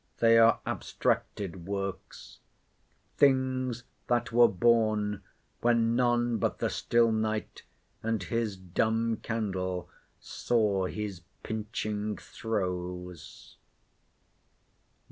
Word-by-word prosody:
They 115 Hz, 0 st, +5 dB
are 115 Hz, 0 st, +5 dB
abstracted 95 Hz, -3 st, -2 dB
works— 100 Hz, -1 st, -5 dB, 0.8 s
"Things 130 Hz, -3 st, +2 dB, 0.2 s
that 120 Hz, -1 st, +1 dB
were 120 Hz, +1 st, +7 dB
born, 105 Hz, -1 st, +2 dB, 0.4 s
when 115 Hz, -1 st, +2 dB
none 120 Hz, -2 st, +2 dB
but -, -, 0 dB
the -, -, -1 dB
still 115 Hz, -1 st, +2 dB
night, 110 Hz, -1 st, -2 dB, 0.4 s
And 110 Hz, -3 st, -1 dB
his 115 Hz, 0 st, -2 dB
dumb 110 Hz, +5 st, 0 dB
candle, 95 Hz, -5 st, -3 dB, 0.3 s
saw 105 Hz, -5 st, 0 dB
his 100 Hz, -3 st, -5 dB, 0.2 s
pinching 105 Hz, -1 st, -3 dB
throes." 90 Hz, -5 st, -5 dB
110 Hz, 85 wpm, -29 LUFS, 95-115 Hz, 0.8 s, were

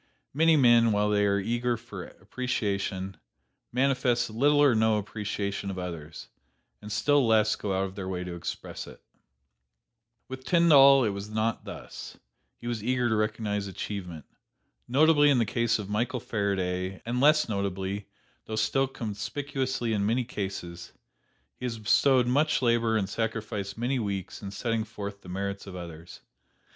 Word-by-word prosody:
Many 160 Hz, +2 st, +4 dB
men, 120 Hz, -4 st, +5 dB
while 105 Hz, 0 st, +2 dB
they 105 Hz, 0 st, +3 dB
are 100 Hz, 0 st, +2 dB
eager 120 Hz, +3 st, -1 dB
for -, -, -9 dB
appreciation, 100 Hz, -6 st, -3 dB, 0.5 s
manifest 125 Hz, -2 st, +1 dB
little 145 Hz, +6 st, +3 dB
or 145 Hz, -3 st, +6 dB
no 110 Hz, -1 st, +3 dB
appreciation 100 Hz, -1 st, -3 dB
of 95 Hz, -, -5 dB
others, 85 Hz, -4 st, -7 dB, 0.5 s
and 105 Hz, -, -8 dB
still 140 Hz, +4 st, +3 dB
less 110 Hz, -1 st, +4 dB
go 100 Hz, -, -4 dB
out 95 Hz, -, +1 dB
of 95 Hz, -1 st, -4 dB
their 95 Hz, -1 st, -6 dB
way 90 Hz, -1 st, -3 dB
to 90 Hz, -1 st, -6 dB
express 85 Hz, -, -6 dB
it. -, -, -12 dB, 1.3 s
"With 130 Hz, 0 st, -8 dB
Tyndall 140 Hz, -5 st, +6 dB
it 105 Hz, -, +1 dB
was 100 Hz, +1 st, -6 dB
not 110 Hz, +1 st, -1 dB
thus; -, -, -9 dB, 0.4 s
he -, -, -13 dB
was 120 Hz, -3 st, -3 dB
eager 125 Hz, 0 st, +1 dB
to 110 Hz, -, +2 dB
recognize 105 Hz, -1 st, -1 dB
achievement. 90 Hz, -5 st, -6 dB, 0.6 s
Notably 145 Hz, +3 st, +5 dB
in 140 Hz, -, +4 dB
the 115 Hz, -, +2 dB
case 115 Hz, +2 st, +1 dB
of 105 Hz, -3 st, -6 dB
Michael 120 Hz, +5 st, -1 dB
Faraday, 95 Hz, -5 st, -2 dB
and 120 Hz, +2 st, -1 dB
less 155 Hz, +2 st, +5 dB
notably, 100 Hz, -1 st, -3 dB, 0.4 s
though 110 Hz, -, -4 dB
still 135 Hz, +4 st, +1 dB
conspicuously 125 Hz, +2 st, -3 dB
in 100 Hz, -2 st, 0 dB
many 115 Hz, +5 st, +1 dB
cases, 95 Hz, -6 st, -6 dB, 0.7 s
he 125 Hz, -, -5 dB
has 115 Hz, -2 st, -3 dB
bestowed 125 Hz, +4 st, +4 dB
much 145 Hz, +3 st, +2 dB
labor 115 Hz, -2 st, +2 dB
and 100 Hz, -3 st, 0 dB
sacrificed 105 Hz, -2 st, -3 dB
many 125 Hz, +3 st, 0 dB
weeks 100 Hz, -4 st, -4 dB
in 100 Hz, -, -6 dB
setting 115 Hz, +2 st, -1 dB
forth 100 Hz, -2 st, -7 dB
the 90 Hz, -, -12 dB
merits 100 Hz, +2 st, -4 dB
of 95 Hz, -, -8 dB
others. 85 Hz, -2 st, -9 dB
110 Hz, 155 wpm, -28 LUFS, 100-125 Hz, 1.3 s, or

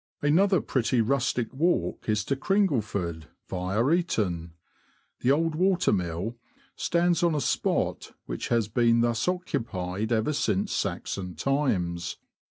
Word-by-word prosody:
Another 180 Hz, +4 st, +4 dB
pretty 125 Hz, -1 st, 0 dB
rustic 120 Hz, 0 st, 0 dB
walk 165 Hz, -3 st, 0 dB
is 105 Hz, -1 st, +1 dB
to 140 Hz, -, 0 dB
Cringleford, 110 Hz, -, 0 dB, 0.2 s
via 95 Hz, +6 st, -1 dB
Eaton. 95 Hz, -, 0 dB, 0.7 s
The 125 Hz, -, +1 dB
old 165 Hz, +3 st, +2 dB
water 185 Hz, -, +2 dB
mill 90 Hz, +5 st, -2 dB, 0.4 s
stands 170 Hz, -1 st, +1 dB
on 170 Hz, -2 st, +2 dB
a -, -, +1 dB
spot -, -, -1 dB
which -, -, -4 dB
has 115 Hz, -3 st, +1 dB
been 115 Hz, +1 st, +3 dB
thus 120 Hz, +3 st, +1 dB
occupied 110 Hz, -, -2 dB
ever 115 Hz, +6 st, +1 dB
since 105 Hz, -9 st, 0 dB
Saxon 90 Hz, -3 st, -3 dB
times. 90 Hz, -, -1 dB
120 Hz, 125 wpm, -27 LUFS, 95-155 Hz, 0.7 s, Another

